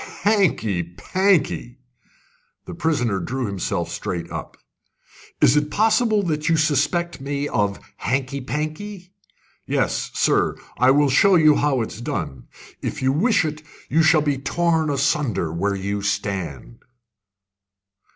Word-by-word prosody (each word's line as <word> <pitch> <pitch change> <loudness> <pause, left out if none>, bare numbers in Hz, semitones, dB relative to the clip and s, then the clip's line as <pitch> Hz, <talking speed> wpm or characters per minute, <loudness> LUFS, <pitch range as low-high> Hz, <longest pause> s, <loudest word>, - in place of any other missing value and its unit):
"Hanky 185 - +2
panky!" 145 - 0 0.9
The - - -7
prisoner 125 -11 0
drew 130 +4 -3
himself 100 -3 -2
straight 85 -1 -4
up. - - -7 0.8
"Is 130 - +5
it 150 0 +1
possible 220 +1 +2
that 155 -3 -1
you 165 - +3
suspect 150 +3 0
me 140 +1 -2
of 100 -5 -1 0.2
hanky 135 +3 -2
panky? 175 +8 -5 0.5
Yes, - - 0
sir, - - +2 0.2
I 125 +1 +5
will 140 0 +4
show 195 +8 +5
you 155 -3 +6
how 140 -4 +1
it's 110 0 -5
done. 65 - -4 0.3
If - - -4
you 130 - +3
wish 180 - +2
it, 155 0 -4 0.3
you 165 - +3
shall 160 -1 +5
be 145 -3 0
torn 160 +2 +1
asunder 135 - 0
where 100 +4 -1
you 100 +1 -3
stand." 85 -12 -3
145 Hz, 130 wpm, -22 LUFS, 105-165 Hz, 0.9 s, you